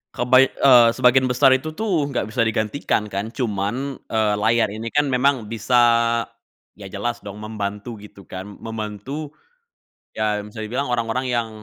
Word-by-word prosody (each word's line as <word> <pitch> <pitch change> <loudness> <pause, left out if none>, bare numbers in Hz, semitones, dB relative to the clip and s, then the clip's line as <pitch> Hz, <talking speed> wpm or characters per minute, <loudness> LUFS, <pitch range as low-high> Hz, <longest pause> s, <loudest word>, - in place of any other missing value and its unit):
kebaik 130 +2 +4
eee, 125 -4 +6
sebagian 130 +1 +4
besar 130 +2 +4
itu 155 +4 0
tuh, 185 -9 0
enggak 120 -5 -3
bisa 115 -2 +1
digantikan, 110 -1 -1
kan, 100 +2 -3
cuman, 120 +3 -3
eee, 110 -2 +1
layar 110 +1 +2
ini 110 +2 -6
kan 145 +2 +1
memang 125 -4 +1
bisa, 115 +2 -1 1.0
ya 100 - -8
jelas 115 +5 -4
dong 105 0 -9
membantu, 105 +1 -5
gitu, 100 -1 -14
kan, 95 +2 -8 0.2
membantu, 115 +7 -6 0.8
ya 105 -1 -1
bisa 105 +1 -10
dibilang 125 +4 -3
orang-orang 120 +2 -1
yang 115 -2 -1
115 Hz, 150 wpm, -21 LUFS, 105-130 Hz, 1.0 s, eee